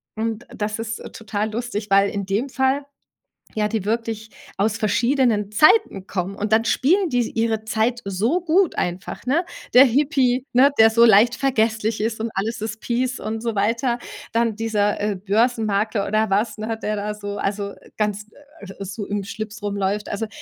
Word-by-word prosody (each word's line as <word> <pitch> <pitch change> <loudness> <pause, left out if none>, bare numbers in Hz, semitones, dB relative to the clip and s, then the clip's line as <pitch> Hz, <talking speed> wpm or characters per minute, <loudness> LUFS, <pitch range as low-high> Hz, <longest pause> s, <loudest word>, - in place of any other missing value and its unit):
Und 225 +1 -3
das 210 +1 -3
ist 225 0 -4 0.2
total 215 -1 -3
lustig, 220 -2 -4
weil 195 0 +4
in 200 -1 -4
dem 220 +8 -1
Fall 265 +2 0 0.7
ja 210 -1 +1
die 215 -2 -2
wirklich 225 0 -3 0.3
aus 210 +2 +1
verschiedenen 225 -1 +1
Zeiten 215 - +4
kommen 190 +1 -3
und 210 +2 -1
dann 225 +1 +3
spielen 350 - +2
die 245 -3 0
ihre 225 -1 0
Zeit 230 +2 0
so 220 - 0
gut 350 +2 +2
einfach, 180 +6 -4
ne? 295 +8 +2 0.3
Der 255 +2 +9
Hippie, 265 -1 +2
ne, 260 +3 +6
der 225 0 +7
so 230 +1 +5
leicht 225 +2 +6
vergesslich 225 -5 0
ist 220 +1 -2
und 225 +1 -2
alles 215 +3 -2
ist 220 0 -4
peace 250 +2 -1
und 220 +1 -4
so 230 -1 -2
weiter. 230 +4 +1 0.4
Dann 230 -1 +1
dieser, 210 -2 0
äh, 205 -1 0
Börsenmarkler 215 0 0
oder 215 +1 +1
was, 210 +4 0
hat 225 +1 -4
der 215 - -1
da 210 +1 -3
so 205 -1 -6
also, 200 0 -2 0.2
ganz 210 0 -2 0.5
so 200 +2 -5
im 205 -1 -2
Schlips 215 +1 -7
rumläuft. 200 0 -2
Also, 215 +2 -3
220 Hz, 170 wpm, -22 LUFS, 205-235 Hz, 0.7 s, Der